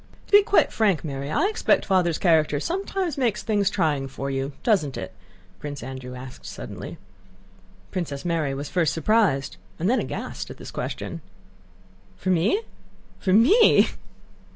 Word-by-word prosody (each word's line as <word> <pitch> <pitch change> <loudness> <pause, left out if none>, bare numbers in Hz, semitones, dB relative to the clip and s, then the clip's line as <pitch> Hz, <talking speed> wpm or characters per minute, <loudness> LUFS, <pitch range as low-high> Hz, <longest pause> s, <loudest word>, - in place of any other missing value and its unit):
"To - - -22
be 410 0 +9
quite 410 0 +3
frank, 200 -7 +2
Mary, 140 -2 -4
I 155 - +1
expect 430 +2 +2
Father's 180 -4 +2
character 155 -4 +3
sometimes 360 - -2
makes 230 -5 0
things 205 -2 +2
trying 150 -8 0
for 135 +1 -5
you, 135 +1 -2
doesn't 190 - +1
it?" - - -6 0.5
Prince 145 -4 -6
Andrew 130 -1 -7
asked 125 0 -10
suddenly. - - -7 0.9
Princess 160 -5 -4
Mary 160 -5 0
was 140 +1 -5
first 170 -2 +1
surprised 165 -5 +2 0.2
and 170 - -1
then 250 +3 +3
aghast - - -5
at - - -9
this - - -9
question. - - -5 1.0
"For 185 - -1
me? 190 - +2 0.6
For 190 - 0
me?... 270 - +6
170 Hz, 150 wpm, -24 LUFS, 140-220 Hz, 1.0 s, be